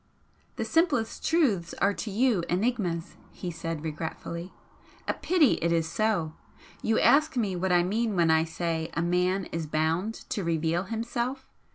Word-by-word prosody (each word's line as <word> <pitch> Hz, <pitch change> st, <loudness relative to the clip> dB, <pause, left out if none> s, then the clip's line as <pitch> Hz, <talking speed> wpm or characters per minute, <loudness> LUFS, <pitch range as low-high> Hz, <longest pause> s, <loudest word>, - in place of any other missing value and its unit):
"The -, -, -2 dB
simplest 290 Hz, -9 st, +1 dB
truths 225 Hz, -, +2 dB
are 200 Hz, +1 st, +2 dB
to 215 Hz, -, -5 dB
you 215 Hz, -3 st, +2 dB
'enigmas,'" 180 Hz, -4 st, -1 dB
he 180 Hz, -, -5 dB
said, 165 Hz, -1 st, -5 dB
regretfully 165 Hz, +3 st, -5 dB, 0.6 s
"A -, -, +2 dB
pity 335 Hz, -8 st, +3 dB
it 170 Hz, -, +1 dB
is 165 Hz, -1 st, +2 dB
so! 170 Hz, -2 st, 0 dB, 0.5 s
You 225 Hz, -, +2 dB
ask 280 Hz, +3 st, +4 dB
me 205 Hz, -6 st, 0 dB
what 185 Hz, +1 st, -1 dB
I 175 Hz, -1 st, +5 dB
mean 215 Hz, +3 st, 0 dB
when 170 Hz, -2 st, +4 dB
I 160 Hz, 0 st, +4 dB
say 165 Hz, 0 st, -2 dB
a 165 Hz, -, +1 dB
man 180 Hz, +2 st, +1 dB
is 165 Hz, -1 st, -3 dB
'bound 165 Hz, +8 st, 0 dB, 0.2 s
to 200 Hz, -, -1 dB
reveal 165 Hz, +2 st, 0 dB
himself.' 235 Hz, +5 st, -3 dB
180 Hz, 160 wpm, -28 LUFS, 165-225 Hz, 0.6 s, I